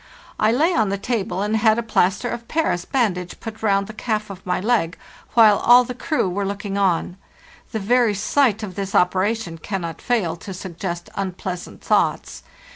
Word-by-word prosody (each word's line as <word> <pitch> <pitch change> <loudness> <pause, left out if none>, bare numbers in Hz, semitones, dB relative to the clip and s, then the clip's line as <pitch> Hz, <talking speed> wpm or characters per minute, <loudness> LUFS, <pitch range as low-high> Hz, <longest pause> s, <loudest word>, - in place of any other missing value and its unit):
I 215 +1 +4
lay 315 +9 +2
on 220 -8 +2
the 200 - -1
table 200 -3 -2
and 210 +1 0
had 220 0 +4
a 235 - -1
plaster 205 0 +1
of 235 -1 -5
Paris 305 - 0
bandage 180 -9 -1
put 220 -1 -8
round 200 -2 +2
the 215 - -9
calf 215 -2 -2
of 190 -1 -10
my 180 - 0
leg, 195 -5 0 0.4
while 215 -3 +7
all 245 +1 +7
the 250 - -5
crew 255 -2 -1
were 190 +3 -2
looking 200 0 -4
on. 185 -2 0 0.5
The 225 - -2
very 230 +1 +2
sight 220 +1 +1
of 195 -3 -5
this 195 +1 -4
operation 185 -1 +1
can 195 +3 -4
not 165 -1 -6
fail 205 -10 0
to 190 +3 -8
suggest 175 -1 -6
unpleasant 185 -2 -5
thoughts. - - 0
200 Hz, 185 wpm, -21 LUFS, 185-230 Hz, 0.5 s, while